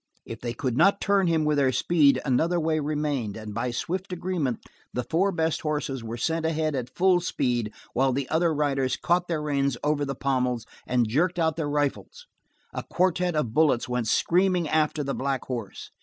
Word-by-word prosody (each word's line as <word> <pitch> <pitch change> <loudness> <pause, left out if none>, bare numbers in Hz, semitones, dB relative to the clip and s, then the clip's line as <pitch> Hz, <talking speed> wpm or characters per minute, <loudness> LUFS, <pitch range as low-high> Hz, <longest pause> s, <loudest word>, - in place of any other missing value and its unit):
If 115 - -7
they 120 -1 -4
could 125 -1 -2
not 195 +8 +4
turn 200 -2 +2
him 160 -2 +2
with 150 -1 +2
their 135 -2 +3
speed 140 0 +3
another 160 +7 +2
way 160 -1 +1
remained, 145 -8 -2
and 110 -1 -7
by 120 +3 -2
swift 185 +10 -3
agreement 170 -8 -2 0.3
the 125 - -2
four 185 +8 +1
best 160 -2 -1
horses 145 -5 -2
were 115 +1 -5
sent 165 +6 -1
ahead 160 -1 0
at 125 -2 -3
full 185 -1 +4
speed 120 -10 -1 0.2
while 135 +1 +2
the 135 +1 -2
other 165 +1 +2
riders 140 -4 0
caught 175 +1 +1
their 160 -3 -2
reins 140 -3 0
over 150 0 +1
the 135 -1 -3
pommels 125 -4 -1 0.2
and 125 -2 +2
jerked 170 +11 +1
out 160 -2 +1
their 160 -3 -2
rifles; 145 - -2 0.5
a - - -3
quartet 180 -1 0
of 125 -8 -1
bullets 150 -6 +3
went 125 -2 -1
screaming 180 - +2
after 155 0 +1
the 140 0 -2
black 135 -1 -2
horse. 115 -6 -6
150 Hz, 190 wpm, -26 LUFS, 125-165 Hz, 0.5 s, not